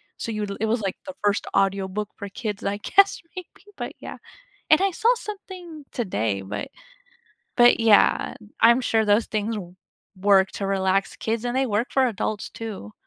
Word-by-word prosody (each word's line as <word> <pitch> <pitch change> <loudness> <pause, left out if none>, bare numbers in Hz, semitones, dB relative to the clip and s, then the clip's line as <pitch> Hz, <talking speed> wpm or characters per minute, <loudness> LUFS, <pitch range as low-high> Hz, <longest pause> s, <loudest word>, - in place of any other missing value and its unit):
so, 230 - -5
you 215 -1 -3
l 200 - -4
it 220 - 0
was 230 +2 +1
like 195 -2 -2
the 285 - -7
1st 205 0 +1
audiobook 195 +1 0
for 200 -2 -7
kids, 205 0 -5
I 200 +1 -1
guess, 395 - +3 0.2
maybe, 365 +2 -10
but, - - -5
yeah, - - -8 0.5
and 310 - +6
I 390 0 +3
saw 465 +7 +3
something 370 -8 -9
today, 110 - -1
but 100 +2 -5 0.9
but, 240 -1 +6
yeah. 225 -2 +4 0.2
I'm 235 +2 +6
sure 225 -2 +2
those 210 +2 +3
things 215 +1 -2
w 180 -3 -8 0.4
work 190 0 +4
to 195 - -3
relax 195 0 0
kids, 225 +1 -2
and 245 +1 -2
they 265 0 +2
work 220 +2 -1
for 265 -1 +3
adults 215 -1 -3
too. 205 - -8
215 Hz, 180 wpm, -24 LUFS, 195-250 Hz, 0.9 s, and